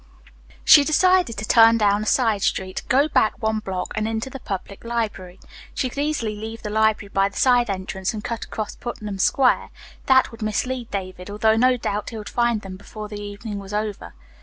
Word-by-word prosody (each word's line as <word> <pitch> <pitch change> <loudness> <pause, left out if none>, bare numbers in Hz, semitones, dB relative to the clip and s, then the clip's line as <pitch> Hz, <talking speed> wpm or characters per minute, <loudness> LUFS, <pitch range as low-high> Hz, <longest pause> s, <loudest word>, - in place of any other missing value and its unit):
She 290 - +9
decided 360 -3 +3
to 210 +1 -4
turn 230 0 +6
down 205 -1 +2
a - - -3
side 225 -5 +2
street, 185 -1 -1
go 275 +4 +4
back 220 -7 +2
one 220 0 0
block 190 -4 -4
and 215 0 -1
into 225 +4 -3
the 270 - -7
public 195 -2 -6
library. 210 -6 -4 0.4
She 260 -3 -1
could 275 - -7
easily 285 -8 -1
leave 220 +2 -7
the 210 - -4
library 220 -1 +1
by 195 0 +2
the 200 - -12
side 245 -3 +3
entrance 190 0 -3
and 215 -2 -6
cut 230 +1 -4
across 215 -1 -5
Putnam 210 -5 -6
Square. 255 +6 +2 0.4
That 260 -1 +4
would 230 0 -12
mislead 235 +3 -2
David, 185 -1 -6
although 220 +2 +2
no 250 +2 +3
doubt 210 -3 -3
he 225 - -7
would 210 - -7
find 235 -3 +1
them 190 -1 -8
before 210 +2 -9
the 205 -1 -7
evening 205 +1 -6
was 200 +1 -7
over. 210 - -4
215 Hz, 200 wpm, -22 LUFS, 205-240 Hz, 0.4 s, She